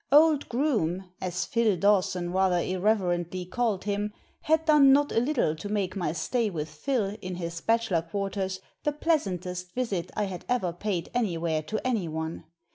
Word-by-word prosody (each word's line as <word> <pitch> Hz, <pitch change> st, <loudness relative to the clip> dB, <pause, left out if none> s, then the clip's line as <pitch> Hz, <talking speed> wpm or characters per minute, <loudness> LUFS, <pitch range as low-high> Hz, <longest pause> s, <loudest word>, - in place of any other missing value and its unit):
Old 300 Hz, 0 st, +5 dB
Groome 200 Hz, -, 0 dB
— -, -, -35 dB
^as 185 Hz, 0 st, -2 dB
Phil 225 Hz, -5 st, +2 dB
Dawson 185 Hz, -3 st, +2 dB
rather 190 Hz, -1 st, +3 dB
irreverently 180 Hz, -1 st, 0 dB
called 220 Hz, 0 st, -1 dB
him 205 Hz, +1 st, -2 dB, 0.2 s
— -, -, -23 dB
^had 320 Hz, +1 st, +3 dB
done 295 Hz, -4 st, +7 dB
not 285 Hz, +1 st, +4 dB
a -, -, +3 dB
little 245 Hz, -, +1 dB
to 205 Hz, +6 st, -7 dB
make 205 Hz, -3 st, -1 dB
my 175 Hz, -6 st, -1 dB
stay 225 Hz, +7 st, 0 dB
with 155 Hz, -4 st, -4 dB
Phil, 205 Hz, -, -1 dB
in 185 Hz, -1 st, -4 dB
his 170 Hz, -1 st, -5 dB
bachelor 225 Hz, -7 st, +2 dB
quarters, 190 Hz, +2 st, -3 dB, 0.2 s
the 295 Hz, -1 st, +1 dB
pleasantest 180 Hz, -, -1 dB
visit 200 Hz, -9 st, -1 dB
I 210 Hz, -, +1 dB
had 190 Hz, -3 st, -5 dB
ever 205 Hz, -9 st, +1 dB
paid 175 Hz, -2 st, -3 dB
anywhere 170 Hz, -9 st, 0 dB
to 215 Hz, +8 st, -3 dB
anyone. 165 Hz, -9 st, -2 dB
195 Hz, 170 wpm, -28 LUFS, 175-235 Hz, 0.2 s, done